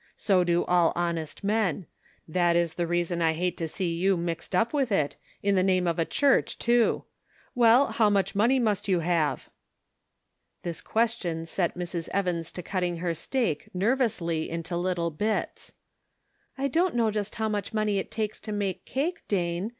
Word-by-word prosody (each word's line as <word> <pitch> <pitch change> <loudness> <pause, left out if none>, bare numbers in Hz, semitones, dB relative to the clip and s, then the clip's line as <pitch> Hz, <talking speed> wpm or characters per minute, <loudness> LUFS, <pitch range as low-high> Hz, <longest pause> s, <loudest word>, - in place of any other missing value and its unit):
So 190 -3 +2
do 175 0 +1
all 175 -2 +3
honest 170 0 -3
men; 200 -4 0 0.4
that 175 +1 +2
is 170 -1 +1
the 170 0 -2
reason 175 0 0
I 160 -1 +3
hate 175 +2 -1
to 165 - -2
see 170 +1 -2
you 185 +3 +2
mixed 170 +2 -3
up 225 +8 +2
with 270 -5 +1
it, 150 -8 +1 0.3
in 200 0 +2
the 185 - +3
name 185 -1 +2
of 170 0 0
a 165 - +2
church, 280 - +2
tooJ 235 -1 +2 0.5
Well, 240 +3 +6
how 220 -2 +3
much 195 -2 +1
money 230 +6 +3
must 215 -6 0
you 185 -3 +2
have? 165 -2 0 0.5
" - - -50
This 170 -2 -4
question 220 -8 -1
set 175 +1 -1
Mrs. 175 -1 -4
Evans' 175 -4 -1
to 180 - -6
cutting 180 -1 -2
her 170 0 -1
steak, 215 - -2
nervously, 190 -7 0
into 165 +1 -4
little 175 -1 -1
bits. 210 +8 -3 0.8
"I 275 +1 0
don't 335 +4 +1
know 230 -2 +2
just 210 -1 -3
how 220 -1 -1
much 210 -2 -2
money 215 -2 +1
it - - -5
takes 215 -1 -3
to 215 - -7
make 200 -3 -2
cake, 330 +6 -2
Dane. 175 0 -1
185 Hz, 180 wpm, -27 LUFS, 170-215 Hz, 0.8 s, Well